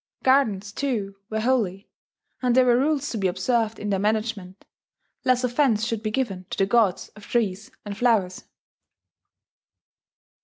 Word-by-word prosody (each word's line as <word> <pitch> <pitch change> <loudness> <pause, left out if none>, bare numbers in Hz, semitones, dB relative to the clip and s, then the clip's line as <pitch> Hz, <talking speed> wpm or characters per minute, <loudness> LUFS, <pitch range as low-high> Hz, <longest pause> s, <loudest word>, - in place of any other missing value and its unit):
Gardens, 220 -7 +2
too, 210 -8 -2
were 220 0 -2
holy; 215 -6 0 0.5
and 250 -2 +2
there 255 0 +5
were 245 -1 +4
rules 290 0 +1
to 225 - -3
be 190 - +1
observed 220 +4 0
in 210 0 -4
their 195 - +1
management, 210 -2 -2 0.6
lest 255 -1 +2
offence 245 -3 +2
should 230 -2 -2
be 215 - -2
given 210 -7 -3
to - - -5
the 195 - +3
gods 200 -2 +2
of 210 -1 -15
trees 210 -4 -1 0.2
and 205 -1 -5
flowers. 210 -6 +1
220 Hz, 150 wpm, -24 LUFS, 195-245 Hz, 0.6 s, there